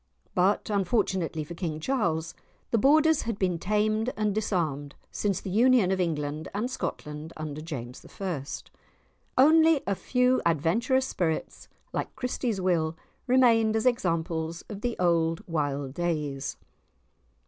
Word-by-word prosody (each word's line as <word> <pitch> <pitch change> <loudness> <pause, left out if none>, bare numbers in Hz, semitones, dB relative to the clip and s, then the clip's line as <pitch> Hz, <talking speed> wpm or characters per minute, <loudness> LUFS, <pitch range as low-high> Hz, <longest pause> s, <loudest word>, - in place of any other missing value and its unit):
But, 195 +4 +2
unfortunately 190 -5 0
for 150 - -8
King 165 -3 -4
Charles, 170 -7 -1 0.4
the 230 - +3
Borders 310 +4 +5
had 230 -3 -3
been 180 -4 0
tamed 215 +5 +1
and 210 -1 +1
disarmed 160 -9 -1 0.2
since 200 -3 -1
the 190 - -6
union 235 -2 +4
of 190 -1 +1
England 155 -2 -2
and 235 +5 -1
Scotland 150 -9 -5
under 155 -1 -5
James 130 -6 -7 0.2
I. 180 -8 -2 0.9
Only 315 +2 +6
a 200 - +1
few 250 +5 +2
adventurous 200 - +2
spirits 165 -9 -2 0.3
like - - -3
Christie's 250 -4 -2
Will 165 -3 +1 0.3
remained 230 -4 +4
as 220 - 0
examples 165 -7 0
of 205 -2 -7
the 240 0 -2
old 165 -2 +1
wild 145 -5 -2
days. 150 -5 -2
180 Hz, 130 wpm, -27 LUFS, 160-230 Hz, 0.9 s, Only